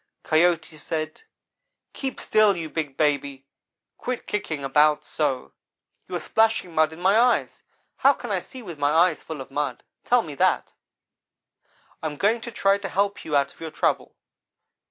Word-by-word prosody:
"Coyote 165 0 +2
said: 155 +1 -4 0.7
'Keep 265 -2 -4
still, 210 -3 +3
you 160 -2 -5
big 150 -4 -3
baby. 140 -3 0 0.5
Quit 250 -1 -4
kicking 155 -8 -3
about 150 +2 +3
so. 140 -5 -2 0.5
You - - -5
are - - -1
splashing 220 -5 +1
mud 155 0 +3
in 160 - -11
my 190 +3 +3
eyes. 245 +1 +2 0.4
How 275 +2 +5
can 240 -5 -7
I 195 - +1
see 255 +7 -11
with 170 -7 -8
my 145 0 +2
eyes 165 +1 +3
full 160 -4 -7
of 135 - -10
mud? 140 -3 -2 0.2
Tell - - +3
me - - -7
that. - - +1 1.3
I 160 - -1
am 150 -1 -6
going 220 +6 +2
to 235 - -7
try 200 -2 +2
to 195 -1 -5
help 200 +2 0
you 150 - -2
out 140 0 +2
of - - -25
your 165 - -5
trouble.' 155 - -1
160 Hz, 175 wpm, -24 LUFS, 150-200 Hz, 1.3 s, How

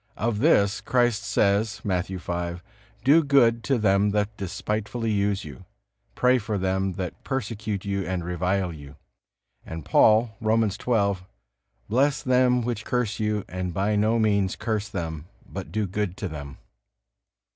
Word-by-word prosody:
Of 110 -1 -1
this 105 -8 +3
Christ 120 -3 +2
says, 105 +1 +1
Matthew 95 -1 -1
v: 85 -1 -3 0.5
"Do 150 +6 +6
good 120 -5 +4
to 135 - +2
them 100 -1 +3
that 105 +1 -1
despitefully 105 +3 -3
use 100 -2 0
you. 70 -5 -10 0.5
Pray 125 0 +4
for 105 -1 -3
them 95 0 0
that 90 -1 -6
persecute 105 -6 -3
you 100 -1 -1
and 90 -2 -2
revile 90 +1 -1
you." 75 -2 -11 0.7
And 80 -2 -7
Paul, 110 0 +4
Romans 110 -2 +2
xii: 100 -5 +2 0.7
"Bless 135 +6 +2
them 125 -1 +3
which 115 -2 -3
curse 125 -3 -1
you, 105 -2 -1
and 90 -2 -4
by 100 +2 +1
no 110 +3 +2
means 100 -4 +2
curse 110 -2 -2
them, 80 -6 -5 0.2
but 95 -1 -7
do 110 -1 0
good 95 -1 -3
to 100 - -3
them." 70 -4 -8
105 Hz, 145 wpm, -25 LUFS, 95-115 Hz, 0.7 s, Do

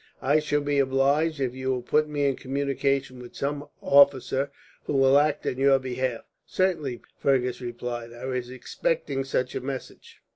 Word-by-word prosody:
I 145 +3 +4
shall 145 -1 0
be 145 0 0
obliged 140 +4 +2
if 130 -3 -1
you 130 0 -4
will 125 -2 -1
put 150 +4 +1
me 145 -1 0
in 135 -1 +2
communication 135 -1 -1
with 125 -1 -11
some 145 +1 -3 0.2
officer 140 -1 +4 0.4
who - - -2
will 135 0 +5
act 150 0 0
on 130 - -2
your 135 0 +5
behalf." 130 -2 -3 0.2
"Certainly," 160 -10 -1 0.2
Fergus 125 -2 +1
replied. 120 -1 -5
"I 120 +2 -9
was 125 -2 -3
expecting 135 +2 -2
such 130 -1 -1
a - - -3
message." 135 0 -8
135 Hz, 170 wpm, -26 LUFS, 130-140 Hz, 0.4 s, will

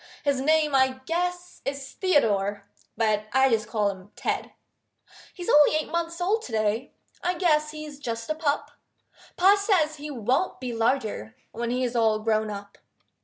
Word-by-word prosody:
His 280 -2 +1
name 305 +1 +3
I 260 -1 +3
guess 355 +2 -3
is 275 -1 -4
Theodore, 205 - +1 0.3
But 215 -2 +1
I 265 0 +5
just 215 -2 +1
call 210 -2 +1
him 190 0 -13
Ted. - - -2 0.8
He's 355 -2 -8
only 295 +1 +6
eight 310 - -1
months 335 0 -2
old 405 +6 +1
to - - -9
day 220 +3 -1 0.3
I 360 +1 +1
guess 305 -4 +2
he's 305 -2 -8
just 230 -4 -4
a 310 - 0
pup; 305 -2 -1 0.7
Pa 385 +3 +6
says 370 -7 +1
he 295 +1 -7
won't 260 - 0
be 250 -2 -4
larger 225 - -1 0.2
When 235 +1 -3
he 250 +1 0
is 245 -1 -2
all 220 -2 +3
grown 215 0 0
up. 200 -1 -8
265 Hz, 170 wpm, -26 LUFS, 220-310 Hz, 0.8 s, only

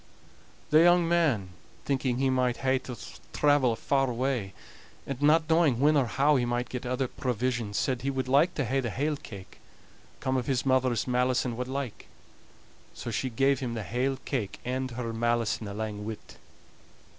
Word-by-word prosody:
The 155 +1 +7
young 175 0 +5
man, 155 - +2 0.4
thinking 130 -3 0
he 135 0 +2
might 125 -2 +1
hae 130 0 +3
to 125 -2 -8 0.4
travel 145 -4 +3
a - - -1
far 135 +2 +1
way, 120 -5 -2 0.5
and 135 -1 -5
not 155 +2 +4
knowing 160 -7 +3
when 150 +3 +4
or 135 -4 +3
how 140 +5 +3
he 125 - +1
might 120 +1 -2
get 125 0 -5
other 125 +1 -1
provisions, 120 -4 -2
said 130 -2 0
he 135 - -1
would 130 -1 -2
like 145 +7 +3
to 145 - 0
hae 135 +4 0
the 120 -3 -2
hale 145 +8 -1
cake, 100 -8 -11 0.6
com 130 0 0
of 125 - -2
his 130 -1 0
mother's 130 -5 +2
malison 125 -1 +1
what 125 +1 -4
like; 135 -3 -5 0.9
so 120 - -5
she 130 +4 -1
gave 135 +3 +2
him 120 -3 -3
the 110 - -3
hale 130 +6 -1
cake, 110 -8 -3
and 130 +1 -2
her 120 -1 -4
malison 115 -1 0
alang 105 +1 -4
wi't. 110 0 -8
130 Hz, 180 wpm, -28 LUFS, 120-135 Hz, 0.9 s, The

